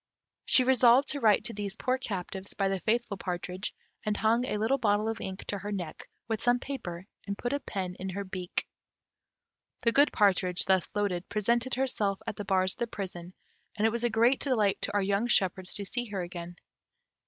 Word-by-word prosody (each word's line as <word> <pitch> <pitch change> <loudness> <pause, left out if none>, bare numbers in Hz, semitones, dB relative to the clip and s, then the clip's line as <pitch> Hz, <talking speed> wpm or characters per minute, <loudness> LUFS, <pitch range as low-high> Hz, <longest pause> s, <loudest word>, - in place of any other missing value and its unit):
She 255 - +6
resolved 255 +1 +5
to 285 - 0
write 215 -5 +4
to 230 - -3
these 205 0 -4
poor 255 +3 0
captives 190 -3 -5
by 195 -1 +1
the 195 -1 -1
faithful 225 0 0
partridge, 180 +1 -4 0.3
and 210 -1 -1
hung 230 +3 +2
a 210 - -1
little 225 +6 +1
bottle 210 -2 +2
of 225 0 -3
ink 190 0 -6
to 200 - -3
her 205 +1 -5
neck, 180 -6 -5 0.2
with 225 -2 -2
some 245 0 +4
paper, 190 -10 -6 0.2
and 200 0 -3
put 245 - -2
a 285 - 0
pen 190 -8 -4
in 190 - -4
her 200 +2 -3
beak. 185 -2 -4 1.2
The 230 - +5
good 285 +4 +5
partridge, 185 -3 +2
thus 190 -2 +2
loaded, 190 -4 -1
presented 235 +4 +1
herself 220 -7 0
at - - -4
the 205 - -6
bars 185 -1 +2
of - - -20
the 235 - 0
prison, 185 -4 -6 0.4
and 215 0 +1
it 225 - +4
was 235 +1 -2
a 240 - +3
great 235 +4 +3
delight 220 -8 +1
to - - 0
our 205 - +3
young 200 +4 +1
shepherds 190 -4 +1
to 205 - +2
see 245 +5 -2
her 200 -5 -4
again. 175 0 -7
205 Hz, 205 wpm, -29 LUFS, 190-235 Hz, 1.2 s, She